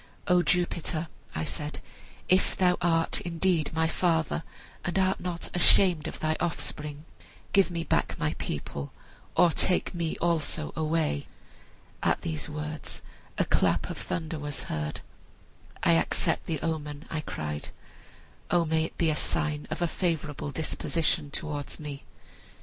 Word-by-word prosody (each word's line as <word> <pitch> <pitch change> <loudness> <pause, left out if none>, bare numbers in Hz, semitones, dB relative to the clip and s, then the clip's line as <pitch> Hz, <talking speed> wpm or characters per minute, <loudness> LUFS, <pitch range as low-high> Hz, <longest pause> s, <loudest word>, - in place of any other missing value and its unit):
'O 180 0 +5
Jupiter,' 170 -1 +1 0.3
I 80 - -1
said, 150 - -3 0.5
'if 185 +1 +3
thou 180 -1 +4
art 165 -1 +3
indeed 170 -2 +1
my 160 0 +2
father, 165 -1 +1 0.4
and 175 +2 -1
art 190 0 +3
not 175 -2 -4
ashamed 175 -2 +5
of - - -5
thy 155 0 +1
offspring, 150 -3 -2 0.5
give 195 -1 +5
me 170 -1 -2
back - - +1
my - - 0
people, 70 0 -4 0.5
or 175 - +7
take 180 +4 +1
me 170 -2 -1
also 160 -2 0
away!' 155 - 0 0.7
At - - +2
these 80 - -3
words 150 0 -5 0.3
a - - +3
clap - - +2
of - - -6
thunder 160 -1 -3
was 145 -1 -4
heard. 75 -1 -3 0.8
'I - - +5
accept 85 0 +2
the 160 -3 -1
omen,' 150 -2 -3
I 155 - -1
cried; 75 - -4 0.8
'O 175 -1 +3
may 160 0 +2
it - - -8
be 165 -2 +3
a - - 0
sign 150 0 0
of - - -1
a - - +3
favorable 160 -5 -1
disposition 160 -1 0
towards 145 -1 -3
me!' 145 -2 -6
160 Hz, 145 wpm, -29 LUFS, 150-175 Hz, 0.8 s, or